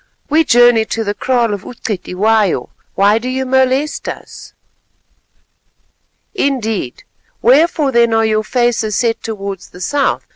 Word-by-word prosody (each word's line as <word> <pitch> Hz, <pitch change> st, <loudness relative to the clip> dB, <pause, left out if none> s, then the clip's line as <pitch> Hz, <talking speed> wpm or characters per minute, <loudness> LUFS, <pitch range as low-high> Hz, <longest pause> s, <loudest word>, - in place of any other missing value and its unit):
"We 320 Hz, +2 st, +4 dB
journey 240 Hz, -4 st, +4 dB
to 225 Hz, +1 st, -3 dB
the 205 Hz, -1 st, -2 dB
kraal 240 Hz, -2 st, 0 dB
of 200 Hz, -, -4 dB
U'Cetywayo; 205 Hz, -, -1 dB, 0.3 s
why 205 Hz, +3 st, +3 dB
do 250 Hz, +2 st, -5 dB
you 260 Hz, +1 st, -2 dB
molest 265 Hz, +3 st, 0 dB
us?" -, -, -10 dB, 1.8 s
"Indeed. 225 Hz, -, -2 dB, 0.4 s
Wherefore 290 Hz, +3 st, +3 dB
then 235 Hz, -1 st, +3 dB
are 225 Hz, 0 st, +2 dB
your 215 Hz, 0 st, +1 dB
faces 235 Hz, -3 st, 0 dB
set 230 Hz, -2 st, 0 dB
towards 200 Hz, -4 st, -6 dB
the 180 Hz, -, -14 dB
south? 285 Hz, +8 st, 0 dB
230 Hz, 125 wpm, -15 LUFS, 215-260 Hz, 1.8 s, We